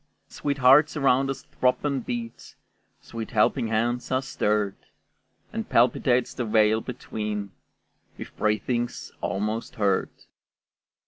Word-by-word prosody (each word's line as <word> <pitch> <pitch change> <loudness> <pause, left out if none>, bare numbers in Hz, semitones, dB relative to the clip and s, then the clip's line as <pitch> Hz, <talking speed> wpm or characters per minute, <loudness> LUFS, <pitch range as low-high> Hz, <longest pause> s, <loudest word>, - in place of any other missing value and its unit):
Sweet 140 -1 -3
hearts 140 +4 +5
around 135 -1 +3
us 135 - -4
throb 125 +2 0
and 140 -4 -1
beat, 115 -1 -6 0.5
Sweet 115 -1 -7
helping 110 0 +2
hands 120 +2 -1
are 130 +1 +1
stirred, 105 -6 0 0.8
And - - -4
palpitates 125 0 +2
the 125 - -3
veil 110 0 +3
between 105 -5 -5 0.7
With - - -9
breathings 120 +3 -1
almost 105 +3 -3
heard. 100 -3 +1
115 Hz, 115 wpm, -25 LUFS, 105-130 Hz, 0.8 s, hearts